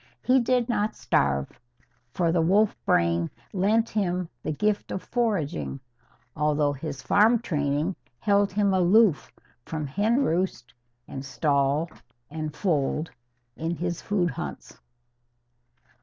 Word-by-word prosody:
He 260 +1 +4
did 245 -1 +1
not 215 -3 0
starve, 70 - 0 0.5
for 170 +4 +1
the 170 -1 +2
wolf 200 +6 +3
brain 85 0 +2 0.2
lent 215 +4 +2
him 180 -4 -1
the - - -3
gift 210 +7 0
of 185 - -4
foraging; 185 - -1 0.6
although 150 -1 +1
his 140 -1 -6
farm 220 +4 +4
training 150 -4 -1 0.2
held 200 - +2
him 200 0 +2
aloof 185 0 +4 0.3
from 155 +3 -4
hen 215 - +1
roost 165 - -1 0.3
and 135 - -6
stall 140 +3 +1 0.4
and 155 -1 -5
fold, 155 -3 0 0.4
in 165 +4 -3
his 175 0 -3
food 180 -5 0
hunts. 70 - -7
170 Hz, 120 wpm, -26 LUFS, 145-205 Hz, 0.6 s, He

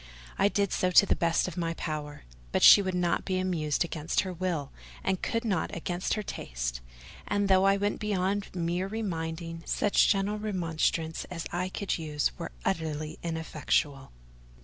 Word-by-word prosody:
I 195 - +5
did 200 -1 0
so 185 - +1
to 180 - +7
the - - +2
best 165 -2 +1
of 170 - -6
my 165 -1 -1
power: 150 -2 -5 0.3
but - - +1
she 205 - +10
would 190 -2 -2
not 175 -1 +1
be 185 -1 -1
amused 170 -4 0
against 160 -1 -1
her 185 -2 -4
will, 170 -6 -2 0.3
and 190 -1 0
could 230 +1 -1
not 190 -7 -1
against 175 +2 -2
her 215 - -3
taste; - - -4 0.5
and 205 0 +1
though 190 0 +5
I 195 0 +5
went 205 +1 -1
beyond 200 -1 0
mere 175 +2 -1
reminding, 165 -5 -4
such 205 - +3
gentle 205 +1 +1
remonstrances 165 -5 -1
as 170 -2 -6
I 180 +1 -1
could 195 -1 -2
use 150 -2 0
were 165 - -5
utterly 155 -4 -2
ineffectual. 155 -4 -1
175 Hz, 170 wpm, -29 LUFS, 160-195 Hz, 0.5 s, she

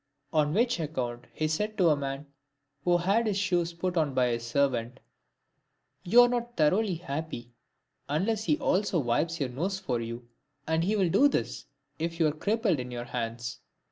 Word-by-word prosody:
On 150 -2 +3
which 235 -1 +2
account 125 -6 -3
he 155 - -1
said 210 +8 -2
to 180 -4 +5
a 150 - +4
man, 140 0 -4 0.6
who 175 -1 +4
had 200 +6 +2
his 205 -2 0
shoes 175 -4 +1
put 180 +1 -3
on 150 -4 +1
by 125 -1 +3
his 115 0 -2
servant, 120 -1 0 0.5
" - - -48
You 230 +7 +7
are - - +5
not 240 -1 -3
thoroughly 185 +5 +3
happy, 145 -6 -5 0.6
unless 205 +9 0
he 300 - +2
also 195 - +1
wipes 155 +5 0
your 135 -3 -1
nose 175 +10 -2
for 130 -11 -2
you; 115 +1 -6 0.4
and 160 +1 +1
he 205 +5 +1
will 190 -4 +2
do 285 - +6
this, - - -2 0.3
if 165 +1 -3
you 165 - +4
are 155 - +3
crippled 200 - 0
in 125 0 -5
your 120 -1 -5
hands." 115 -1 -4
160 Hz, 185 wpm, -29 LUFS, 130-195 Hz, 0.6 s, You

